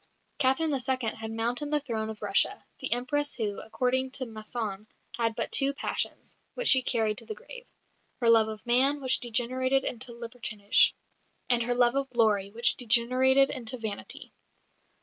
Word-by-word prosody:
Catherine 290 +3 +2
II. 255 -3 0
had 220 0 -6
mounted 235 +6 -2
the 300 0 +2
throne 225 -6 -4
of 220 - -8
Russia - - +2
the - - -4
Empress 285 +4 0
who, 210 -4 -3
according 255 +3 -1
to 265 - -2
Masson, 215 -2 -5 0.3
had 230 -1 -1
but - - -2
two 275 +1 +5
passions, - - -4 0.2
which - - +1
she 260 - +7
carried 220 -4 0
to - - -14
the 435 - -6
grave - - -12 0.5
"her 235 - 0
love 225 -1 +6
of 215 +1 -8
man, 265 +4 +2
which 260 -2 +1
degenerated 255 +3 0
into 240 0 -3
libertinage; 230 -3 +1 0.6
and 240 -1 +3
her 245 +1 0
love 240 -1 +4
of 275 0 -2
glory, 215 -5 +1
which 235 +3 +1
degenerated 255 +3 +3
into 250 0 -4
vanity." 220 -3 -7
245 Hz, 165 wpm, -28 LUFS, 225-265 Hz, 0.6 s, she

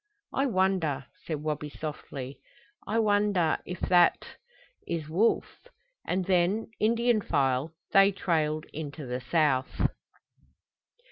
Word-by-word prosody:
"I 275 +1 +1
wonder," 185 - +1 0.2
said 150 -3 -3
Wabi 150 -1 -2
softly. 140 -3 -7 0.5
"I 220 - 0
wonder 205 -6 +2
if 180 0 -5
that 175 -2 +4 0.6
is 165 -3 -3
Wolf?" 200 - 0 0.4
And 185 +1 0
then, 190 +5 +1
Indian 230 +1 +2
file, 140 -1 0 0.2
they 195 0 +6
trailed 155 -5 0
into 150 -1 -6
the 125 +1 -4
south. 145 -4 +1
170 Hz, 110 wpm, -28 LUFS, 150-195 Hz, 0.6 s, they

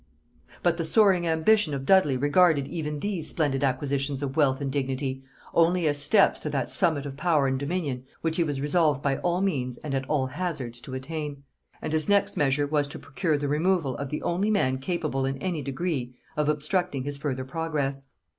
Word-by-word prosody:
But 175 -1 +2
the 165 - -1
soaring 185 -1 +4
ambition 160 0 +3
of 135 -1 -5
Dudley 185 -8 +4
regarded 145 +1 +3
even 150 -3 -4
these 185 -7 -1
splendid 145 -4 0
acquisitions 140 +1 -1
of 135 -1 -3
wealth 135 -4 +3
and 140 -2 -2
dignity 135 -1 -2 0.3
only 170 0 +3
as 145 -1 +3
steps 190 +8 +4
to - - -4
that - - -2
summit 160 -6 +2
of 140 -1 -6
power 155 -2 +2
and 130 0 0
dominion 140 -4 -3 0.2
which 165 0 -1
he 170 - +3
was 145 -4 -2
resolved 150 -1 +2
by 135 -1 +1
all 175 +1 0
means 130 -11 -1
and 150 -3 -6
at 135 -1 -2
all 145 -4 +1
hazards 130 -5 -4
to 130 - -7
attain; 145 +1 -5 0.4
and 155 - -3
his 155 +4 +1
next 200 0 +3
measure 145 0 +2
was 145 0 0
to 145 - -8
procure 140 +3 -1
the 145 0 -2
removal 155 -2 +1
of 140 -1 -4
the 150 - -4
only 185 +5 0
man 130 -11 +1
capable 150 -2 -2
in 135 0 -1
any 175 -1 -3
degree 135 -3 -3 0.2
of 150 0 +1
obstructing 150 -1 0
his 145 +1 -3
further 130 -3 -3
progress. 140 -2 -3
145 Hz, 195 wpm, -26 LUFS, 135-170 Hz, 0.4 s, soaring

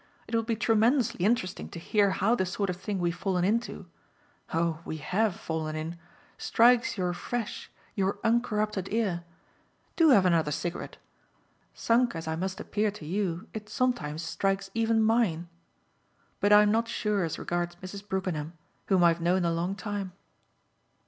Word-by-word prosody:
It - - -10
will 230 - +3
be 225 0 -1
tremendously 225 -1 +2
interesting 205 -4 0
to - - -9
hear 205 +3 +2
how 200 +4 +2
the 215 - +1
sort 200 +1 -1
of 175 - -6
thing 200 +2 -3
we've 175 -1 0
fallen 185 -1 -1
into 230 +4 -1 0.7
oh 165 -1 0
we 160 - -5
HAVE 185 +7 0
fallen 160 -6 -4
in! 160 +2 -4 0.4
strikes 240 0 +4
your 180 -2 0
fresh, 235 +5 -4 0.2
your 195 0 0
uncorrupted 215 -4 0
ear. 200 -6 0 0.7
Do 330 -2 +5
have 205 -9 +6
another 165 -4 +3
cigarette. 170 +4 -4 0.8
Sunk 235 -2 +2
as 165 0 -5
I 160 - -1
must 185 +3 -3
appear 210 0 0
to 200 -6 -9
you 180 0 -2
it 215 -1 -7
sometimes 240 - -1
strikes 195 +2 -1
even 225 -1 +2
mine. 215 -7 +1 0.9
But 205 - +2
I'm 210 0 +7
not 230 +1 +1
sure 210 -4 0
as 165 - -2
regards 175 0 -2
Mrs. 185 +3 -8
Brookenham, 175 -5 -2 0.3
whom 190 -3 +4
I've 170 0 +4
known 175 +1 +2
a 170 - +2
long 170 +3 -1
time." 205 -3 -4
195 Hz, 160 wpm, -28 LUFS, 175-220 Hz, 0.9 s, I'm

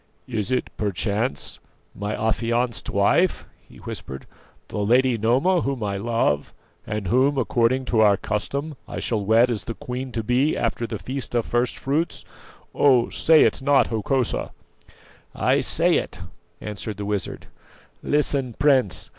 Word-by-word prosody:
"Is 115 -1 -2
it, 125 - -1
perchance, 105 +3 -1 0.3
my 105 +1 -4
affianced 115 0 -1
wife?" 100 - +2 0.2
he - - -15
whispered; 65 - -7 0.4
"the - - -4
lady 125 +4 +3
Noma, 130 - +2
whom 135 -5 -2
I 100 -1 -2
love, 105 -9 0 0.3
and 105 -1 -3
who, 130 +8 +2
according 120 +3 +1
to 115 - 0
our 105 -2 +5
custom, 140 - -3
I - - -5
shall 110 -4 -1
wed 115 +4 +4
as 110 - -4
the 115 - -5
queen 125 +1 -5
to 115 - -2
be 125 +7 +1
after 115 0 -1
the 115 - -4
feast 130 +3 -5
of 120 - +1
first 120 +1 0
fruits? 150 +5 -2 0.5
Oh! 130 -4 +4
say 160 -1 +5
it - - +1
not, 140 0 +3
Hokosa." 120 +3 -1 0.8
"I - - +2
say - - +2
it," - - -4 0.4
answered 105 0 -6
the 100 - -4
wizard. 105 -1 -3 0.6
"Listen, 140 -4 0
Prince. 135 - +2
120 Hz, 145 wpm, -23 LUFS, 105-130 Hz, 0.8 s, our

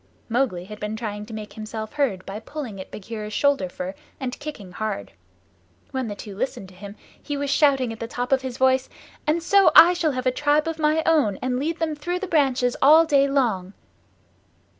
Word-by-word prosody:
Mowgli 225 -7 0
had 210 +2 -10
been 210 +1 -3
trying 210 -2 -5
to 225 - -9
make 210 -1 -7
himself 220 0 -6
heard 240 -11 -1
by 195 +2 -6
pulling 230 -5 -7
at - - -11
Bagheera's 215 0 -7
shoulder 280 -9 +2
fur 180 +1 -5 0.3
and 255 -2 -4
kicking 290 -11 -8
hard. 195 - -4 0.8
When 260 -2 -2
the 205 - -5
two 200 -1 -9
listened 205 -4 -4
to - - -16
him 200 +2 -10 0.3
he 290 -1 -4
was 280 0 -2
shouting 270 -5 +3
at 225 - -11
the 230 - -4
top 245 +2 -4
of 265 -1 +3
his 260 -2 -5
voice, 260 0 +2 0.4
"And 320 +2 +1
so 395 +2 +5
I 345 +2 +10
shall 325 -4 0
have 255 0 -3
a 255 - +3
tribe 295 +4 +1
of 325 -1 -3
my 310 +1 +2
own, 295 -12 +3
and 250 0 0
lead 320 +4 -2
them 320 -2 -1
through 350 +5 -3
the 390 - -4
branches 265 -7 +2
all 315 +4 +7
day 280 -3 +4
long." 225 -9 0
255 Hz, 205 wpm, -24 LUFS, 210-295 Hz, 0.8 s, I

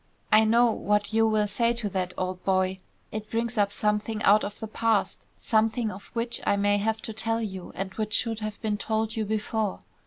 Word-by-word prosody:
I 215 +1 +6
know 235 +2 +4
what 210 0 0
you 225 0 +4
will 215 -1 +2
say 230 +3 +1
to 235 -3 -2
that, 185 -1 -2
old 185 0 -3
boy. 190 0 +1 0.3
It 215 0 -5
brings 230 +1 -1
up 205 -2 +2
something 210 +1 -1
out 210 +1 +5
of 205 - -5
the 220 - -5
past; 220 -3 0
something 225 0 +1
of 195 +1 -10
which 235 0 -1
I - - +2
may 205 0 +2
have 220 +2 -1
to 220 - -5
tell 225 +1 0
you 190 -5 -5
and 195 0 -4
which 215 -1 -1
should 225 -2 0
have 215 -1 -5
been 210 -1 0
told 220 0 -1
you 220 -1 -1
before. 215 -1 -2
215 Hz, 210 wpm, -27 LUFS, 205-225 Hz, 0.3 s, I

